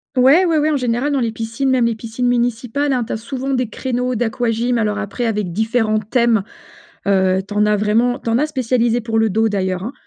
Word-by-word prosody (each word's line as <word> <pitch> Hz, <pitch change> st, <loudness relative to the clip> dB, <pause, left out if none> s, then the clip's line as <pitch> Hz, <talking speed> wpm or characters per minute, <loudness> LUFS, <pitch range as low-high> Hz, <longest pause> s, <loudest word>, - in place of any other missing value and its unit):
Ouais, 270 Hz, +8 st, +5 dB
ouais, 330 Hz, -3 st, +2 dB
ouais 305 Hz, +1 st, +2 dB
en 295 Hz, -, +1 dB
général 250 Hz, +2 st, -1 dB
dans 275 Hz, -, +1 dB
les 230 Hz, -3 st, 0 dB
piscines 230 Hz, +4 st, -3 dB
même 255 Hz, -2 st, +3 dB
les 235 Hz, -, +1 dB
piscines 230 Hz, +2 st, -3 dB
municipales, 245 Hz, +3 st, 0 dB
hein, 250 Hz, -2 st, +1 dB
tu -, -, -5 dB
as -, -, -2 dB
souvent 265 Hz, +4 st, -4 dB
des 250 Hz, -3 st, -1 dB
créneaux 250 Hz, 0 st, -2 dB
d'aquagym 235 Hz, +1 st, 0 dB
alors 210 Hz, -2 st, 0 dB
après 215 Hz, +3 st, -3 dB
avec 210 Hz, -5 st, -2 dB
différents 220 Hz, +1 st, +1 dB
thèmes. 230 Hz, 0 st, +1 dB, 0.7 s
Heu, 190 Hz, -1 st, +3 dB
tu 205 Hz, -, -7 dB
en 210 Hz, 0 st, +3 dB
as 210 Hz, 0 st, +3 dB
vraiment, 225 Hz, +4 st, +1 dB
tu 230 Hz, -, -3 dB
en 230 Hz, -, +2 dB
as 300 Hz, -, +1 dB
spécialisés 245 Hz, -4 st, 0 dB
pour 225 Hz, -1 st, -1 dB
le 220 Hz, -1 st, +2 dB
dos 220 Hz, +3 st, +2 dB
d'ailleurs, 190 Hz, -3 st, -2 dB
hein. 230 Hz, +7 st, -5 dB
235 Hz, 225 wpm, -18 LUFS, 220-250 Hz, 0.7 s, Ouais